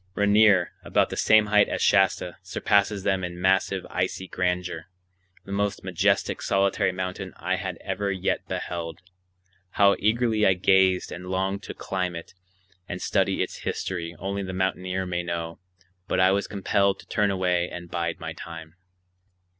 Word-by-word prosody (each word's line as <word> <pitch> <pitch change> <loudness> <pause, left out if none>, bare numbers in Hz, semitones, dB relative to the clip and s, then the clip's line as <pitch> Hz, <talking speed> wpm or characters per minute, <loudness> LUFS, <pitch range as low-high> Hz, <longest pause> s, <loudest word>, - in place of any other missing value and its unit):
Rainier, 100 -3 +4
about - - +1
the - - -3
same 110 -1 +5
height 105 0 +4
as - - -2
Shasta, 95 -2 +2
surpasses 100 +2 +1
them 95 -1 +1
all 90 - -2
in 90 0 -9
massive 95 0 +1
icy 90 +1 -2
grandeur,—the 90 +1 -5
most 100 0 -1
majestic 95 +1 +1
solitary 95 -1 +1
mountain 95 0 -5
I 95 +2 -1
had 95 -3 -4
ever 100 +1 -2
yet 95 -2 -2
beheld. 85 -2 -4 0.8
How 100 -1 +5
eagerly 110 0 +2
I 95 - +6
gazed 95 0 +3
and 90 +1 -7
longed 95 +1 -1
to - - -8
climb 90 -2 -3
it 85 - -9 0.6
and - - -4
study - - +1
its - - -6
history 85 -2 -4
only 100 +1 -3
the 95 -1 -5
mountaineer 95 0 -1
may 90 -1 -2
know, 85 -1 -4 0.5
but - - 0
I 95 +1 +5
was 100 +1 0
compelled 100 -1 +1
to - - -19
turn 105 -1 +1
away 90 -2 0
and 85 -1 -9
bide 85 -1 -2
my 80 -1 -5
time. 80 0 -10
95 Hz, 160 wpm, -25 LUFS, 90-100 Hz, 0.8 s, I